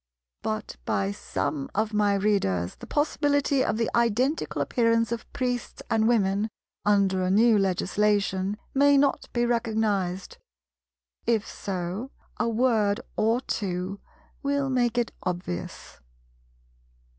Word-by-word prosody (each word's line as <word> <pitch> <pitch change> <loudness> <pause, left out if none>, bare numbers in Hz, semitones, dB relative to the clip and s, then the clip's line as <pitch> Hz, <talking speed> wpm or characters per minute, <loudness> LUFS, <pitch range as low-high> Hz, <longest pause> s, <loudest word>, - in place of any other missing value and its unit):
But 215 -1 -4
by 195 0 0
some 275 +6 -3
of 215 +1 0
my 205 -1 +3
Readers 190 - +1
the - - -12
possibility 285 -2 +1
of 215 - 0
the 230 -1 +1
identical 235 +6 +1
appearance 230 -2 +2
of 235 -1 -5
Priests 245 -1 -3
and 220 -1 +3
Women, 210 -2 +2 0.3
under 200 -2 +3
a 185 - 0
new 220 +4 +5
Legislation, 195 +1 +1 0.2
may 285 +1 +5
not 275 0 +1
be 240 0 +1
recognized; 215 -6 -1 0.9
if 225 -3 +2
so, 190 +5 -4 0.3
a 235 - +1
word 220 -3 +2
or 225 +3 +2
two 190 -4 -3 0.4
will 280 -1 0
make 245 -2 +1
it 240 -2 +1
obvious. 175 - -5
220 Hz, 120 wpm, -26 LUFS, 195-240 Hz, 0.9 s, new